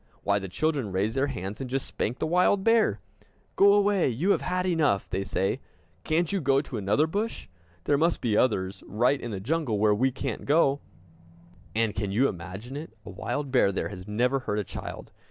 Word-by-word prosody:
Why, 100 Hz, 0 st, +2 dB
the 95 Hz, -1 st, -6 dB
children 140 Hz, -, -1 dB
raise 100 Hz, +4 st, 0 dB
their 135 Hz, +1 st, +1 dB
hands, 105 Hz, -3 st, -5 dB
and 130 Hz, -, -5 dB
just 135 Hz, +1 st, -2 dB
spank 120 Hz, +4 st, -3 dB
the -, -, -1 dB
wild 180 Hz, +4 st, +3 dB
bear! 225 Hz, -, +3 dB, 0.6 s
"Go 200 Hz, +1 st, +6 dB
away, 205 Hz, -2 st, +3 dB
you 150 Hz, -, +1 dB
have -, -, +2 dB
had 180 Hz, 0 st, -1 dB
enough!" 155 Hz, -, +1 dB
they 95 Hz, +1 st, -2 dB
say. 95 Hz, 0 st, -1 dB, 0.4 s
"Can't 165 Hz, +3 st, +1 dB
you 195 Hz, -2 st, 0 dB
go 135 Hz, -1 st, +3 dB
to 140 Hz, -4 st, -5 dB
another 105 Hz, +9 st, +2 dB
bush? 205 Hz, +8 st, -3 dB, 0.4 s
There 140 Hz, +7 st, +2 dB
must 165 Hz, +2 st, +2 dB
be 115 Hz, -4 st, 0 dB
others 95 Hz, -5 st, +1 dB
right 125 Hz, +6 st, +1 dB
in -, -, -5 dB
the 100 Hz, -4 st, -4 dB
jungle, 135 Hz, 0 st, -1 dB
where 105 Hz, 0 st, +4 dB
we 130 Hz, +6 st, +2 dB
can't 130 Hz, -, -5 dB
go!" 145 Hz, -2 st, +3 dB, 1.0 s
And, 110 Hz, -2 st, +1 dB
can 100 Hz, -1 st, -3 dB
you 125 Hz, +7 st, +3 dB
imagine 95 Hz, +8 st, -7 dB
it, 150 Hz, -1 st, -7 dB
a -, -, -8 dB
wild 130 Hz, +8 st, -4 dB
bear 125 Hz, -6 st, +4 dB
there 95 Hz, -, -2 dB
has 95 Hz, -1 st, -9 dB
never 125 Hz, +6 st, +1 dB
hurt 105 Hz, -5 st, -3 dB
a 105 Hz, -, 0 dB
child! -, -, -8 dB
130 Hz, 205 wpm, -27 LUFS, 105-155 Hz, 1.0 s, Go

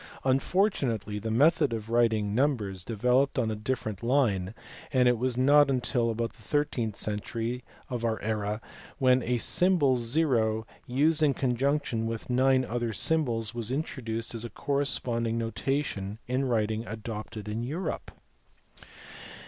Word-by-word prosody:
Unfortunately 130 Hz, -, +1 dB
the 110 Hz, +2 st, -4 dB
method 145 Hz, +5 st, +4 dB
of 110 Hz, 0 st, -5 dB
writing 110 Hz, -3 st, +2 dB
numbers 110 Hz, -8 st, 0 dB
developed 125 Hz, +7 st, +1 dB
on 110 Hz, -4 st, 0 dB
different 110 Hz, -4 st, -3 dB
lines, 115 Hz, -8 st, +1 dB, 0.4 s
and 125 Hz, -2 st, +4 dB
it 120 Hz, -2 st, +3 dB
was 125 Hz, 0 st, 0 dB
not 145 Hz, +2 st, +5 dB
until 125 Hz, -2 st, +1 dB
about 115 Hz, +1 st, -2 dB
the 115 Hz, -, -20 dB
thirteenth 120 Hz, -3 st, -1 dB
century 115 Hz, +4 st, -3 dB, 0.2 s
of 120 Hz, -2 st, -4 dB
our 115 Hz, -1 st, 0 dB
era 105 Hz, 0 st, -2 dB, 0.4 s
when 130 Hz, -2 st, +4 dB
a 125 Hz, +1 st, 0 dB
symbol 150 Hz, -1 st, +3 dB
zero 115 Hz, -4 st, +1 dB, 0.2 s
used 150 Hz, +5 st, +2 dB
in 145 Hz, -4 st, +3 dB
conjunction, 130 Hz, -2 st, 0 dB
with 115 Hz, +2 st, -5 dB
nine 130 Hz, +1 st, +3 dB
other 120 Hz, -1 st, -2 dB
symbols 115 Hz, -, 0 dB
was 115 Hz, -2 st, -3 dB
intro 140 Hz, 0 st, -3 dB
duced 115 Hz, 0 st, -3 dB
that 115 Hz, -1 st, -4 dB
a 120 Hz, -, -5 dB
corresponding 120 Hz, -4 st, -1 dB
notation 115 Hz, -3 st, -2 dB
in 130 Hz, +2 st, 0 dB
writing 110 Hz, -3 st, 0 dB
was 110 Hz, -1 st, -6 dB
adopted 110 Hz, -1 st, -6 dB
in 105 Hz, +2 st, -3 dB
Europe. 155 Hz, +7 st, -4 dB
120 Hz, 140 wpm, -28 LUFS, 110-135 Hz, 0.4 s, not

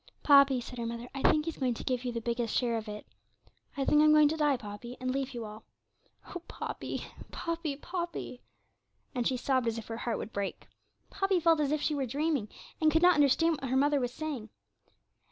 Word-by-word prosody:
'Poppy,' 280 Hz, -3 st, +6 dB
said 245 Hz, 0 st, -8 dB
her 235 Hz, -, -2 dB
mother, 235 Hz, +1 st, -5 dB
'I 275 Hz, -, -5 dB
think 305 Hz, 0 st, +2 dB
He's 330 Hz, -, -4 dB
going 255 Hz, -3 st, 0 dB
to -, -, -7 dB
give 255 Hz, -1 st, -1 dB
you 250 Hz, -, -2 dB
the 230 Hz, -1 st, -4 dB
biggest 235 Hz, -1 st, -1 dB
share 240 Hz, -2 st, +1 dB
of 220 Hz, -1 st, -4 dB
it. 210 Hz, 0 st, -7 dB, 0.7 s
I 275 Hz, -, 0 dB
think 300 Hz, +2 st, +5 dB
I'm 305 Hz, 0 st, +6 dB
going 305 Hz, -1 st, +6 dB
to 315 Hz, -, -1 dB
die, 295 Hz, -4 st, +2 dB
Poppy, 235 Hz, +2 st, -8 dB
and 255 Hz, 0 st, -1 dB
leave 270 Hz, -1 st, -3 dB
you 235 Hz, -2 st, -4 dB
all. 215 Hz, +1 st, -10 dB, 0.7 s
Oh! 360 Hz, -, -5 dB
Poppy, -, -, -5 dB, 0.3 s
Poppy, 335 Hz, -3 st, -3 dB
Poppy!' 345 Hz, -5 st, -5 dB, 0.7 s
and 245 Hz, -3 st, 0 dB
she 260 Hz, -, 0 dB
sobbed 255 Hz, -1 st, +1 dB
as 230 Hz, 0 st, -1 dB
if 225 Hz, -, -6 dB
her 225 Hz, -, -4 dB
heart 235 Hz, -2 st, -2 dB
would 225 Hz, -, -7 dB
break. 200 Hz, -1 st, -4 dB, 0.4 s
Poppy 390 Hz, -1 st, +1 dB
felt 330 Hz, -1 st, +4 dB
as 290 Hz, -2 st, +1 dB
if 305 Hz, -1 st, 0 dB
she 305 Hz, -, +1 dB
were 275 Hz, -3 st, -1 dB
dreaming, 285 Hz, -3 st, -1 dB, 0.3 s
and 310 Hz, 0 st, +5 dB
could 320 Hz, +2 st, +2 dB
not 360 Hz, 0 st, +8 dB
understand 310 Hz, +2 st, +3 dB
what 265 Hz, -, -3 dB
her 260 Hz, -, +2 dB
mother 290 Hz, +1 st, +3 dB
was 245 Hz, -2 st, -1 dB
saying. 275 Hz, -7 st, -5 dB
265 Hz, 220 wpm, -30 LUFS, 235-305 Hz, 0.7 s, not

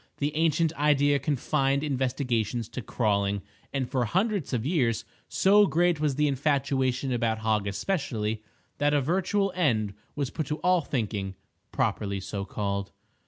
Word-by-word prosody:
The 145 Hz, +1 st, -1 dB
ancient 160 Hz, 0 st, +2 dB
idea 145 Hz, -1 st, +3 dB
confined 140 Hz, -1 st, 0 dB
investigations 125 Hz, -5 st, -1 dB
to 125 Hz, +2 st, -5 dB
crawling; 100 Hz, -3 st, 0 dB, 0.3 s
and 135 Hz, -2 st, -1 dB
for 130 Hz, -1 st, 0 dB
hundreds 195 Hz, -, 0 dB
of 120 Hz, -3 st, -1 dB
years 130 Hz, -, +1 dB, 0.2 s
so 205 Hz, +1 st, +5 dB
great 175 Hz, -1 st, +2 dB
was 150 Hz, -3 st, +1 dB
the 150 Hz, +1 st, +2 dB
infatuation 135 Hz, -2 st, 0 dB
about 115 Hz, -2 st, +1 dB
Hog 110 Hz, -2 st, 0 dB
especially, 110 Hz, -, -2 dB, 0.4 s
that 145 Hz, +1 st, +3 dB
a -, -, +4 dB
virtual 190 Hz, +6 st, +1 dB
end 110 Hz, -, +1 dB, 0.2 s
was 140 Hz, -3 st, -2 dB
put 155 Hz, -5 st, -3 dB
to 150 Hz, -, -2 dB
all 180 Hz, -1 st, +3 dB
thinking, 105 Hz, -8 st, -3 dB, 0.4 s
properly 100 Hz, -1 st, -1 dB
so 100 Hz, +1 st, -4 dB
called. 100 Hz, -1 st, -3 dB
135 Hz, 145 wpm, -27 LUFS, 110-150 Hz, 0.4 s, so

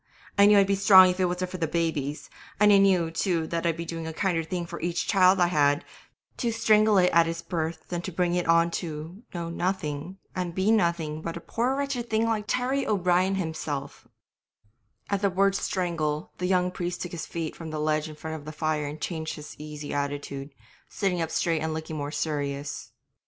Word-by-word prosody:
I 200 Hz, 0 st, +6 dB
knew 210 Hz, 0 st, +7 dB
I'd 200 Hz, -, +6 dB
be 200 Hz, -, +1 dB
strong 190 Hz, -2 st, +7 dB
if 180 Hz, -, -6 dB
it 185 Hz, -, +3 dB
wasn't 180 Hz, +1 st, -2 dB
for 185 Hz, -, -4 dB
the 165 Hz, -, 0 dB
babies, 155 Hz, -3 st, -2 dB, 0.3 s
and 210 Hz, 0 st, +6 dB
I 200 Hz, -, +7 dB
knew, 185 Hz, -4 st, +3 dB
too, 165 Hz, -1 st, 0 dB
that 170 Hz, +1 st, -2 dB
I'd 165 Hz, -1 st, 0 dB
do 165 Hz, 0 st, -5 dB
a -, -, -3 dB
kinder 175 Hz, -2 st, 0 dB
thing 175 Hz, +2 st, -3 dB
for -, -, -8 dB
each 175 Hz, 0 st, -1 dB
child 190 Hz, -1 st, +4 dB
I 175 Hz, -, +5 dB
had, 145 Hz, -4 st, +2 dB, 0.5 s
to 235 Hz, -, 0 dB
strangle 215 Hz, -2 st, +4 dB
it 180 Hz, -1 st, +4 dB
at 170 Hz, 0 st, +5 dB
it's 165 Hz, 0 st, -4 dB
birth 160 Hz, -2 st, -4 dB
than 175 Hz, -1 st, -2 dB
to 190 Hz, -, -5 dB
bring 175 Hz, 0 st, 0 dB
it 175 Hz, -1 st, 0 dB
on 170 Hz, 0 st, +4 dB
to 165 Hz, +3 st, -7 dB
know 170 Hz, -1 st, -4 dB
nothing 175 Hz, -1 st, -3 dB, 0.2 s
and 180 Hz, -2 st, -3 dB
be 190 Hz, +3 st, +2 dB
nothing 170 Hz, -7 st, +1 dB
but 165 Hz, +1 st, -4 dB
a -, -, -5 dB
poor 245 Hz, +8 st, -1 dB
wretched 275 Hz, -4 st, -2 dB
thing 220 Hz, 0 st, +2 dB
like 220 Hz, -2 st, 0 dB
Terry 260 Hz, +4 st, 0 dB
O'Brien 185 Hz, -1 st, +2 dB
himself 155 Hz, -5 st, -4 dB, 0.5 s
' 105 Hz, -1 st, -40 dB
At 200 Hz, -1 st, +1 dB
the 200 Hz, -, +3 dB
word 195 Hz, +1 st, +2 dB
'strangle' 170 Hz, -6 st, -2 dB
the 180 Hz, -, -1 dB
young 180 Hz, -1 st, +2 dB
priest 175 Hz, -1 st, -4 dB
took 175 Hz, -, -6 dB
his 170 Hz, -, -5 dB
feet 165 Hz, -2 st, -4 dB
from 165 Hz, -1 st, -7 dB
the 155 Hz, -, -4 dB
ledge 155 Hz, 0 st, 0 dB
in 155 Hz, -, -9 dB
front 160 Hz, +1 st, -6 dB
of 145 Hz, -, -12 dB
the 155 Hz, -, -6 dB
fire 155 Hz, -1 st, -1 dB
and 150 Hz, +2 st, -7 dB
changed 160 Hz, -1 st, -3 dB
his 150 Hz, -1 st, -9 dB
easy 150 Hz, -1 st, -7 dB
attitude, 140 Hz, -1 st, -3 dB, 0.4 s
sitting 185 Hz, -4 st, -1 dB
up 165 Hz, -, -1 dB
straight 165 Hz, -1 st, 0 dB
and 160 Hz, 0 st, -2 dB
looking 160 Hz, 0 st, -5 dB
more 145 Hz, -1 st, -3 dB
serious. 145 Hz, -2 st, -3 dB
170 Hz, 215 wpm, -27 LUFS, 155-190 Hz, 0.5 s, knew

